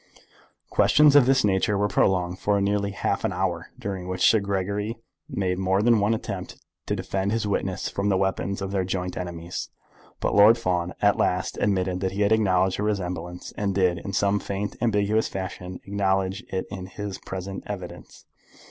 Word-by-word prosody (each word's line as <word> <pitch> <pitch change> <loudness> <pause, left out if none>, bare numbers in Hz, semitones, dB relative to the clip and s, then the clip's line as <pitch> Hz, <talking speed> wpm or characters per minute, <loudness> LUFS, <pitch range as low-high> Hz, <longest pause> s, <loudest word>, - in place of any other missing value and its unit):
Questions 150 -1 +5
of 140 -4 +7
this 135 0 +4
nature 100 +1 +2
were 105 +1 +2
prolonged 90 -2 +1
for 100 +2 +1
near 100 +1 +1
half 100 - -1
an - - 0
hour, - - -2
during 95 -2 -5
which 90 0 +2
Sir 110 - +5
Gregory 100 +3 -2 0.3
made 90 -2 -1
more 95 +2 +2
than 115 -1 +5
one 105 +3 +2
attempt - - -6 0.3
to - - 0
defend 95 +1 -2
his 115 0 0
witness 95 -2 -1
from 100 +1 -1
the 95 - +3
weapons 95 +1 -1
of 95 - -4
their 95 -2 0
joint 90 -1 -3
enemies; 85 -1 -5 0.5
but - - 0
Lord 105 +3 +7
Fawn 90 -5 -1
at 105 0 +4
last 90 +1 0
admitted 95 -2 +1
that 95 0 -2
he 100 - -2
had 100 +1 +3
acknowledged 95 -4 +2
the - - 0
resemblance, 90 -4 -3
and 100 -2 -1
did, 90 -3 +2
in 100 - -6
some 100 +2 +2
faint 100 +1 -4
ambiguous 110 -1 +2
fashion, 90 -1 -6
acknowledge 95 +1 0
it 95 -1 -2
in 95 -2 -6
his 100 0 -6
present 95 +1 -6
evidence. 90 -4 -8
95 Hz, 180 wpm, -25 LUFS, 95-105 Hz, 0.5 s, of